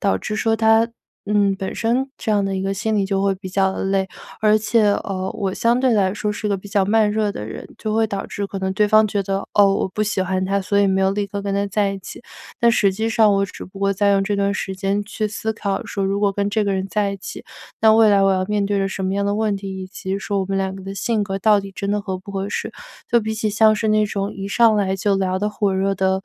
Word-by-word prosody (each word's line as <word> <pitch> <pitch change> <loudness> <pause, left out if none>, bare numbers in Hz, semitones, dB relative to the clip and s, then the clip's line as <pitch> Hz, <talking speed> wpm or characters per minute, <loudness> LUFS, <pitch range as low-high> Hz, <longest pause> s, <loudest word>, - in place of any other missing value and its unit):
导 200 - +1
致 215 - -4
说 225 0 +1
他 225 +1 +4 0.4
嗯， 200 -1 +2
本 190 0 -5
身， 255 +4 0
这 220 - -2
样 205 -1 +2
的 195 -1 -2
一 190 - -2
个 195 0 -1
心 215 +2 -1
理 200 - +2
就 195 0 -1
会 195 -1 +2
比 185 0 -8
较 190 0 +1
累。 195 0 0 0.3
而 215 -1 +4
且， 215 +1 +2
呃， 190 -2 -1
我 195 -3 -1
相 235 +1 +2
对 255 -1 +2
来 195 -3 +2
说 210 0 -2
是 210 +1 -4
一 - - -1
个 200 - +1
比 195 - -11
较 200 0 +1
慢 210 0 +2
热 215 -1 0
的 105 - -6
人， 110 - -8
就 215 -1 -3
会 225 0 +3
导 200 -2 -4
致 200 -1 -4
可 195 - -6
能 190 0 -2
对 210 +1 +2
方 215 +1 +5
觉 200 -1 -1
得： 195 0 -3
“哦， 200 -1 +5
我 - - 0
不 210 +3 -2
喜 205 -2 0
欢 185 0 -1
他， 195 +1 0
所 200 +1 +1
以 200 - +4
没 190 0 +1
有 190 - +3
立 205 0 -1
刻 200 0 -5
跟 200 0 -2
他 200 0 +1
在 200 0 0
一 195 - -5
起。” 190 - -10 0.4
但 235 0 +4
实 200 -3 +3
际 220 +4 -2
上 220 -2 +4
我 195 - +2
只 200 - -9
不 190 +2 -13
过 195 0 +1
在 200 +1 +2
用 195 0 +2
这 205 0 -1
段 200 0 +1
时 190 -2 -3
间 195 +1 -1
去 215 +1 -3
思 220 +1 -3
考 200 -3 -3
说： 200 - -4
“如 195 +1 0
果 200 -1 +2
跟 200 +1 -1
这 215 +1 0
个 200 - 0
人 190 0 -1
在 205 0 0
一 - - -5
起， - - -8 0.4
那 220 -1 +7
未 220 -1 +6
来 200 -1 +4
我 195 - +4
要 185 0 0
面 210 -1 0
对 200 0 0
着 195 0 0
什 190 0 -4
么 190 - -1
样 200 0 0
的 200 0 0
问 215 -1 0
题， 195 -1 -6
以 185 - -6
及 190 0 -4
说 200 0 -2
我 190 - -2
们 195 - -2
两 190 0 -1
个 195 - -9
的 195 +1 -6
性 215 +2 0
格 195 -1 -3
到 205 +1 +4
底 195 - -9
真 200 +1 -3
的 210 - 0
合 190 -2 -4
不 195 +2 -11
合 195 0 -3
适？” - - -4 0.4
就 235 - +3
比 220 0 -3
起 215 0 -1
像 215 +1 +4
是 220 +1 -1
那 215 0 +3
种 200 -1 -3
一 195 0 -5
上 225 +1 +4
来 195 -2 0
就 200 +1 +1
聊 185 -1 0
得 210 +2 0
火 205 -2 0
热 195 +1 +1
的， 190 0 0
200 Hz, 315 characters per minute, -21 LUFS, 195-215 Hz, 0.4 s, 那